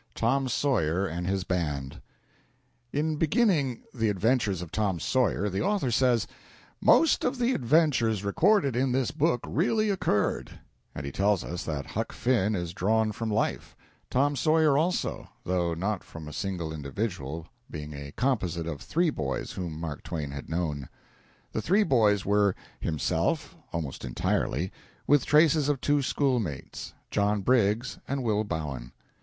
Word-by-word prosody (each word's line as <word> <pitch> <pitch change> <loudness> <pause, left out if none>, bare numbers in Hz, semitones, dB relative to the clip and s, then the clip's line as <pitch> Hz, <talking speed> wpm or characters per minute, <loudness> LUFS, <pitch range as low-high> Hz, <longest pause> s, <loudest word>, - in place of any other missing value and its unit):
V. - - -9
TOM 130 +3 +2
SAWYER 100 - +1
AND 90 0 -3
HIS 95 -1 0
BAND 75 -7 -2 0.9
In 155 +1 0
beginning 160 - +2
"The 115 -3 +1
Adventures 105 -2 +1
of 85 - -10
Tom 100 -5 0
Sawyer" 95 +6 +1
the 95 -1 -1
author 195 -10 +1
says, 120 -2 +3 0.6
"Most 325 - +5
of 255 - 0
the 250 +1 +2
adventures 125 - +2
recorded 150 - +3
in 130 0 +1
this 130 -2 +1
book 150 -5 +1
really 215 - +1
occurred," 105 - 0 0.4
and - - -5
he 70 - -4
tells 100 +3 +2
us 85 0 -5
that 75 -3 -3
Huck - - -4
Finn 110 -4 +1
is 85 -2 -3
drawn 110 +4 +1
from 115 +1 -4
life; 105 +1 -1 0.3
Tom 145 +3 +2
Sawyer 155 +1 +3
also, 170 +5 0
though 85 -2 0
not 95 +3 -2
from 80 -2 -10
a 75 - -8
single 85 -2 -3
individual, 80 0 -4 0.2
being 75 0 -6
a 70 0 -7
composite 95 -11 0
of 80 -4 -5
three 170 0 +1
boys 65 - -3
whom 85 -4 -5
Mark 80 -3 -5
Twain 75 -4 -4
had 70 0 -7
known. 80 -5 -2 0.6
The 110 - -2
three 195 - +3
boys 110 - +3
were 100 -1 +3 0.2
himself, 85 - -1 0.2
almost 80 -5 -4
entirely, 65 +6 -1 0.3
with 145 -1 +3
traces 150 -1 +4
of 145 -3 +1
two 145 +2 +2
schoolmates, 125 - -2 0.2
John 105 0 +1
Briggs 115 +1 +2
and 135 -1 -2
Will 110 -2 +1
Bowen. 70 - -5
105 Hz, 150 wpm, -28 LUFS, 85-135 Hz, 0.9 s, Most